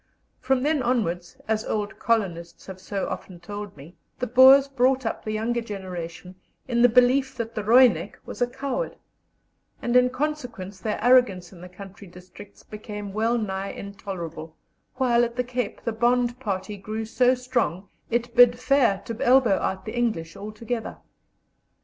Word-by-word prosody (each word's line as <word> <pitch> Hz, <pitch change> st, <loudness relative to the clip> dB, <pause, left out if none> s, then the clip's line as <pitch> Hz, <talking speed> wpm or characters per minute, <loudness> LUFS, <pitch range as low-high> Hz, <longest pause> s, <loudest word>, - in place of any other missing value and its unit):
From 260 Hz, 0 st, 0 dB
then 300 Hz, -1 st, +1 dB
onwards, 185 Hz, -9 st, -1 dB
as 220 Hz, 0 st, 0 dB
old 210 Hz, -2 st, -3 dB
colonists 175 Hz, -7 st, -2 dB
have 190 Hz, -1 st, -9 dB
so 195 Hz, +1 st, -4 dB
often 180 Hz, -2 st, -7 dB
told 205 Hz, 0 st, -8 dB
me, 150 Hz, +6 st, -13 dB, 0.2 s
the 250 Hz, -, -2 dB
Boers 260 Hz, +3 st, +7 dB
brought 265 Hz, -1 st, +1 dB
up 225 Hz, -, -3 dB
the 215 Hz, -, -4 dB
younger 230 Hz, +3 st, -1 dB
generation 185 Hz, -4 st, -7 dB, 0.3 s
in 240 Hz, -2 st, +1 dB
the 245 Hz, -, +7 dB
belief 255 Hz, +3 st, +3 dB
that 230 Hz, -2 st, -5 dB
the 215 Hz, -, -4 dB
"Roinek" 220 Hz, -6 st, +4 dB
was -, -, -9 dB
a 245 Hz, -, +3 dB
coward, 280 Hz, -, -4 dB, 0.8 s
and 240 Hz, 0 st, -2 dB
in 250 Hz, 0 st, +5 dB
consequence 250 Hz, -9 st, -4 dB
their 215 Hz, +2 st, -2 dB
arrogance 225 Hz, -8 st, +3 dB
in 175 Hz, -, -14 dB
the 180 Hz, -, -10 dB
country 195 Hz, +2 st, -12 dB
districts 180 Hz, +3 st, -14 dB
became 210 Hz, -2 st, -8 dB
wellnigh 215 Hz, -3 st, -1 dB
intolerable, 170 Hz, -5 st, -7 dB, 0.4 s
while 245 Hz, -2 st, +3 dB
at 235 Hz, 0 st, -2 dB
the 250 Hz, -, 0 dB
Cape 245 Hz, -3 st, -4 dB
the 230 Hz, -, -1 dB
Bond 240 Hz, +2 st, +1 dB
party 205 Hz, -3 st, -4 dB
grew 215 Hz, +3 st, -5 dB
so 250 Hz, +3 st, +3 dB
strong 245 Hz, -7 st, -2 dB, 0.2 s
it 235 Hz, 0 st, -2 dB
bid 245 Hz, 0 st, +7 dB
fair 245 Hz, -7 st, +2 dB
to 230 Hz, -, -5 dB
elbow 245 Hz, -6 st, +4 dB
out 190 Hz, 0 st, -3 dB
the 220 Hz, -, -6 dB
English 215 Hz, -9 st, -2 dB
altogether. 215 Hz, +3 st, -5 dB
225 Hz, 160 wpm, -24 LUFS, 195-245 Hz, 0.8 s, Boers